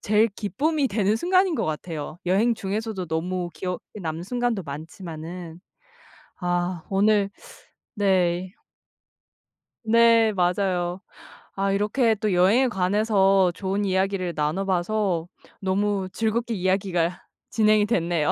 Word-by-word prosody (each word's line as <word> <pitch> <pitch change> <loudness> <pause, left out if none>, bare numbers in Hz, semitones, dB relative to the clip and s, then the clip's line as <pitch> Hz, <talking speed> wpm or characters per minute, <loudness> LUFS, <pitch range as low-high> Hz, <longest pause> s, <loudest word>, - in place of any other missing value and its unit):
제일 215 +2 +3
기쁨이 280 +9 -1
되는 210 0 +1
순간인 365 +5 +2
것 - - -1
같아요. 155 0 -5
여행 215 +6 +3
중에서도 205 -2 -3
너무 175 +2 -2
기억에 180 -1 -3 0.2
남는 160 -1 -4
순간도 240 0 -1
많지만은. 165 +3 -8 0.8
아 175 -1 -2
오늘 200 0 +2 0.6
네. 185 -3 +1 1.3
네 230 0 +5
맞아요. 180 -1 0 0.6
아 195 0 0
이렇게 215 +4 +2
또 210 -1 -1
여행에 200 +9 +4
관해서 195 -2 +3
좋은 195 +1 -2
이야기를 190 -2 0
나눠봐서 180 +2 0 0.3
너무 195 0 0
즐겁게 230 +3 -1
이야기가 185 -3 0 0.2
진행이 215 -1 +3
됐네요. 170 -7 +1
195 Hz, 255 characters per minute, -24 LUFS, 175-215 Hz, 1.3 s, 네